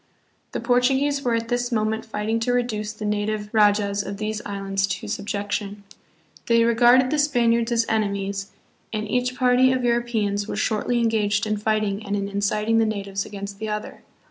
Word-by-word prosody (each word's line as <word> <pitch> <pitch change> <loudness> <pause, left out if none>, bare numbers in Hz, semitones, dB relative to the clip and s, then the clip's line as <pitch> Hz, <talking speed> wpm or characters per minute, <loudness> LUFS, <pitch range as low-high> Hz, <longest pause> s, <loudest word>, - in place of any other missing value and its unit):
The - - -2
Portuguese 265 +4 +2
were 240 -3 +1
at 230 0 -3
this 245 0 -1
moment 220 0 -1
fighting 220 +1 -1
to 245 +2 0
reduce 220 -4 -1
the 215 -1 -7
native 210 0 -1
rajas 205 -1 +3
of 200 -1 -6
these 215 0 -3
islands 195 -1 -1
to 190 -1 -4
subjection. 205 0 -3 0.6
They 230 0 +4
regarded 240 +2 +5
the 305 - +1
Spaniards 235 -5 +2
as 230 -1 +2
enemies, 200 -2 -1 0.4
and 215 -1 -3
each 250 +3 0
party 255 0 +4
of 260 -1 0
Europeans 225 -4 0
was - - -3
shortly 240 +2 0
en 230 - +3
gaged 210 -1 +1
in 215 0 -1
fighting 215 -1 -1
and 200 0 -2
in 200 -1 -2
inciting 210 +3 +1
the 225 - +3
natives 200 -2 -3
against 200 -1 -7
the 220 - -4
other. 210 0 -5
215 Hz, 175 wpm, -23 LUFS, 205-235 Hz, 0.6 s, regarded